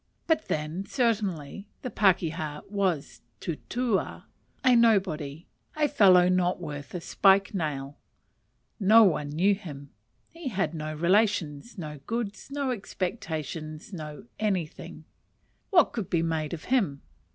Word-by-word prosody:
But 320 -2 +1
then, 155 +5 -2
certainly, 200 - -1 0.2
the 250 - -4
pakeha 165 -6 +1
was 190 -7 -1 0.2
a - - -12
tutua, 220 +6 -2 0.4
a 255 -1 +6
nobody, 180 -10 +2 0.3
a 300 -1 +3
fellow 185 -10 +6
not 180 0 +2
worth 145 -2 -7
a 175 - -3
spike 195 +3 +3
nail; 145 -6 -3 0.8
no 220 +3 +7
one 155 -7 +2
knew 180 +7 +3
him; 145 -8 -8 0.4
he 335 -3 -8
had 195 -8 -1
no 155 -1 -4
relations, 185 +1 +1
no 150 -4 -6
goods, 225 -1 -4
no 280 -2 -1
expectations, 160 - -5
no 155 +2 -7
anything: 190 -7 -3 0.6
what 360 -4 +5
could 215 -7 -4
be 165 -2 +1
made 160 -1 -1
of 160 - -12
him? 170 - +1
185 Hz, 130 wpm, -27 LUFS, 155-215 Hz, 0.8 s, no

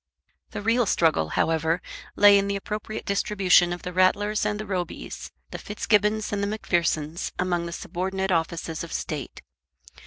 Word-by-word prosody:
The - - -6
real 230 +1 +2
struggle, 155 - +2
however, 165 +1 +1 0.4
lay 205 -1 +7
in 200 - -1
the 200 - -1
appropriate 210 +2 -5
distribution 195 -3 +3
of 175 -1 -5
the 180 - -5
Rattlers 205 +3 +2
and 210 0 -2
the 215 - -4
Robys, 185 -3 -5 0.2
the - - -6
Fitzgibbons 210 +1 0
and 200 - -1
the 200 - 0
Macphersons 170 -6 -1
among 175 -2 -1
the - - -6
subordinate 190 +3 -3
offices 165 -1 -1
of 170 - -8
State. 150 -5 -5
190 Hz, 155 wpm, -25 LUFS, 170-205 Hz, 0.4 s, lay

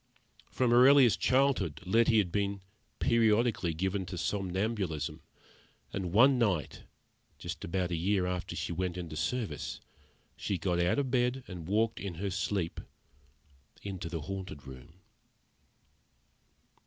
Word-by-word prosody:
From 125 -2 +1
her 125 +2 +7
earliest 135 -5 +6
childhood 125 - +2
Letty 115 +4 +4
had 95 -5 +2
been 100 0 -1 0.4
periodically 110 -6 +2
given 95 +3 -1
to 90 0 -6
somnambulism, 95 -4 -2 0.7
and 95 -3 -3
one 125 +6 +5
night, 95 -10 -1 0.5
just - - -6
about 90 +1 -1
a - - 0
year 95 +3 +1
after 90 -2 -3
she 75 0 -3
went 90 +1 -2
into 85 -4 -6
service, 95 0 -3 0.6
she 100 - -2
got 90 0 0
out 85 +7 +2
of 135 -3 -1
bed, 125 +1 +1
and 90 -4 -8
walked, 110 +3 +1
in 95 -4 -5
her 100 +3 -3
sleep, 95 -2 -2 1.0
into 95 -4 -5
the 80 -2 -4
Haunted 95 -4 -6
Room. 65 +7 -12
95 Hz, 130 wpm, -31 LUFS, 85-115 Hz, 1.0 s, her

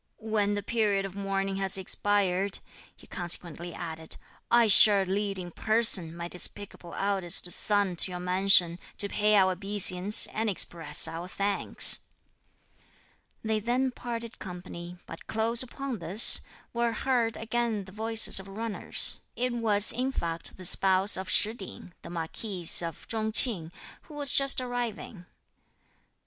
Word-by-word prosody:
"When 215 -2 -3
the 205 - -5
period 205 -3 -2
of 195 - -9
mourning 195 0 -4
has 195 -1 +1
expired," 195 0 -2 0.4
he - - -20
consequently 175 -1 -4
added, 160 -2 -8 0.3
"I 235 -1 +3
shall 205 -1 +6
lead 195 +1 -3
in 175 -1 -8
person, 215 -6 +1
my 170 0 -7
despicable 180 0 -4
eldest 190 -3 0
son 205 -3 +1
to 185 - +5
your 180 -1 -7
mansion, 180 -1 +2 0.2
to 200 - 0
pay 210 +1 0
our 190 -2 +3
obeisance, 195 +1 +1
and 220 0 -3
express 165 -5 +1
our 165 +2 -8
thanks." 200 +2 +5 1.4
They 220 -1 -2
then 250 +4 -2
parted 235 -2 -7
company, 180 -1 -10
but 165 - -13
close 225 +2 -2
upon 260 -1 -6
this, 180 +7 +5 0.3
were 235 -1 -2
heard 235 -2 -2
again 225 -2 -4
the 190 - -14
voices 220 0 0
of 190 - -12
runners. 215 +2 -2 0.2
It 250 0 -3
was, 215 -3 +4
in 255 +2 -3
fact, 165 -8 -6
the 185 - -6
spouse 190 +2 +4
of 190 0 -5
Shih 215 +1 +3
Ting, 190 -4 -11
the - - -12
marquis 175 +3 -7 0.2
of 165 -2 -9
Chung 220 -1 -3
Ching, 195 -9 +4 0.3
who 300 - -16
was 285 -3 +1
just 275 -1 +3
arriving. 240 -7 -7
200 Hz, 145 wpm, -26 LUFS, 180-225 Hz, 1.4 s, shall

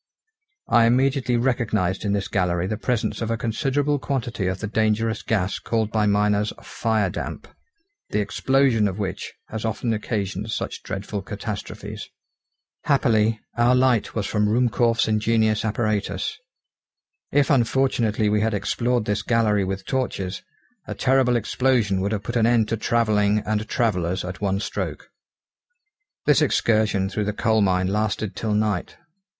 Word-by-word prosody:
I 115 -1 +5
immediately 130 0 +2
recognised 110 -7 0
in 100 - +1
this 100 -2 -1
gallery 90 -2 0
the 110 - -2
presence 120 +1 -2
of 115 - -2
a 115 - 0
considerable 140 +6 0
quantity 120 -8 -2
of 95 +1 -2
the - - -4
dangerous 110 +1 0
gas 100 -4 -1
called 110 -2 -1
by 105 -1 +1
miners 105 0 +2
firedamp, 110 -5 -2 0.6
the 105 - 0
explosion 120 +1 +2
of 95 -1 -4
which 100 -3 -4 0.2
has 110 0 -5
often 115 +1 -1
occasioned 105 -1 -3
such - - -4
dreadful 100 +1 -5
catastrophes. 105 +2 -6 0.8
Happily, 115 -5 +2 0.2
our 120 +1 +4
light 125 -4 +2
was 110 -3 -1
from 105 +1 +1
Ruhmkorff's 120 0 +2
ingenious 110 0 +2
apparatus. 110 -1 -1 1.0
If 145 0 +3
unfortunately 120 -4 +2
we 105 0 +2
had 110 0 +1
explored 120 +3 0
this 105 0 0
gallery 105 -2 +2
with 95 +1 -4
torches, 100 -8 -2 0.5
a - - -5
terrible 130 -2 +3
explosion 115 -4 +1
would 100 +2 -1
have 105 -2 -2
put 120 +5 -5
an 115 -1 +3
end 115 -2 +3
to 115 - 0
travelling 105 -2 +2
and 110 0 -2
travellers 95 -7 0
at 90 +2 -7
one 100 -1 0
stroke. - - -4 1.2
This 150 +1 +4
excursion 110 -8 +2
through 105 +1 -2
the 105 - -1
coal 110 +1 +2
mine 95 -2 +2
lasted 105 +1 -1
till 110 -2 -1
night. 105 -3 -1
110 Hz, 145 wpm, -23 LUFS, 105-120 Hz, 1.2 s, I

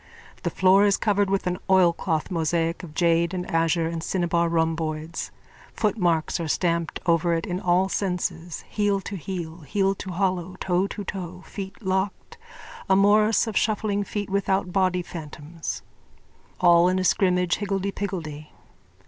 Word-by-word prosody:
The - - -1
floor 190 +2 +4
is 200 -1 +4
covered 205 -2 +1
with 195 -1 0
an 180 0 -1
oilcloth 175 -3 +2
mosaic 165 0 0
of 160 -4 -11
jade 170 +1 +2
and 180 -1 -3
azure 165 0 +2
and 165 0 -4
cinnabar 170 -1 0
rhomboids. 160 -1 -1 0.5
Footmarks 175 -7 +1
are 165 - -2
stamped 170 +1 0
over 170 0 +2
it 165 - -2
in 180 0 -3
all 180 +1 +2
senses, 180 -4 -3
heel 205 -2 +1
to 195 - -6
heel, 170 -2 -5
heel 195 +6 0
to 195 - -8
hollow, 185 -1 -1
toe 185 +1 +1
to 205 - -6
toe, 185 -2 -6
feet 195 +2 -8
locked, 190 - -2 0.5
a 190 - +5
morris 210 +3 +4
of 220 -3 -5
shuffling 210 -2 +1
feet 205 0 -4
without 195 -2 0
body 185 -2 +2
phantoms, 160 -1 -7 0.8
all 175 0 +6
in 185 - +1
a 185 - 0
scrimmage 180 -1 +2
higgledypiggledy. 195 -6 -3
180 Hz, 150 wpm, -25 LUFS, 170-195 Hz, 0.8 s, all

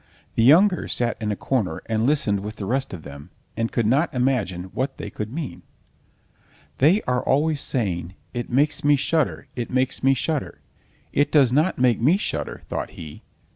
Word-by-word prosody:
the - - +1
younger 175 - +5
sat 120 -1 -1
in 105 -1 -1
a - - -1
corner 100 -9 -1
and 110 +1 0
listened 125 -9 +1
with 105 +2 -6
the 100 - -5
rest 130 +6 -1
of 85 -5 -8
them, 70 +3 -10 0.3
and 115 0 -1
could 115 - 0
not 140 +9 +2
imagine 125 -9 0
what 135 +1 -2
they - - -6
could 105 +1 -5
mean. 150 0 -5 1.2
"They 170 +10 +4
are 125 0 0
always 150 +2 +1
saying: 95 -7 -2 0.2
'It 120 -1 -4
makes 140 +4 +1
me 145 0 +5
shudder, 150 +1 0
it 120 -2 -4
makes 130 0 0
me 135 0 +4
shudder!' 150 +2 -3 0.5
It 145 +1 +2
does 140 -6 +5
not 155 +8 +2
make 125 -3 +2
me 155 +10 +4
shudder," - - -4
thought - - -3
he. 75 -2 -9
125 Hz, 180 wpm, -23 LUFS, 105-145 Hz, 1.2 s, younger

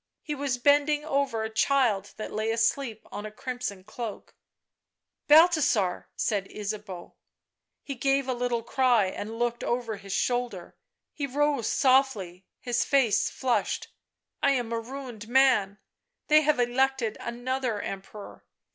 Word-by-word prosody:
He 300 - -3
was 280 -3 -2
bending 290 +3 +3
over 275 -7 0
a 220 - -3
child 220 -4 +1
that 215 - -6
lay 215 +1 -1
asleep 230 0 0
on 205 - -6
a 215 - -5
crimson 245 -4 -5
cloak. 215 +2 -7 0.5
" - - -57
Balthasar/' 295 - +4
said 200 -3 -1
Ysabeau. 205 -3 -6 0.7
He 280 - -5
gave 275 +1 +1
a 260 - 0
little 240 -1 -1
cry 245 -4 +3
and 210 +4 -5
looked 240 0 -1
over 240 -3 -2
his 195 0 -10
shoulder. 240 -5 -2 0.4
He 285 -2 -3
rose 285 -2 0
softly, 255 - +2
his 240 -1 0
face 265 -7 +2
flushed. 255 -2 -1 0.3
" - - -57
I 280 - +4
am 240 -3 -2
a 230 - 0
ruined 240 -3 -8
man. 245 -6 +3 0.5
They 305 0 +7
have 300 -3 +2
elected 245 -2 +1
another 245 -1 -2
Emperor. 195 +1 -8
245 Hz, 140 wpm, -27 LUFS, 215-270 Hz, 0.7 s, They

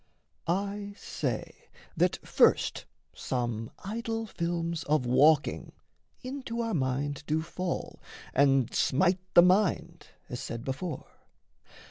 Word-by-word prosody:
I 200 +3 -2
say - - -4 0.3
that - - +2
first - - +3 0.3
some 120 -3 -3 0.2
idol 225 +2 -3
films 170 -4 -2
of 150 -3 +2
walking 145 +5 +3 0.5
Into 255 -2 -5
our 230 -1 -2
mind 140 0 -1
do 155 +1 +1
fall 180 +2 -4 0.3
and 135 -3 +3
smite 185 +6 +2 0.2
the 175 - +10
mind, 180 -3 +2 0.2
As 125 -6 -5
said 115 0 -5
before. 140 +4 -4
170 Hz, 105 wpm, -29 LUFS, 135-195 Hz, 0.5 s, the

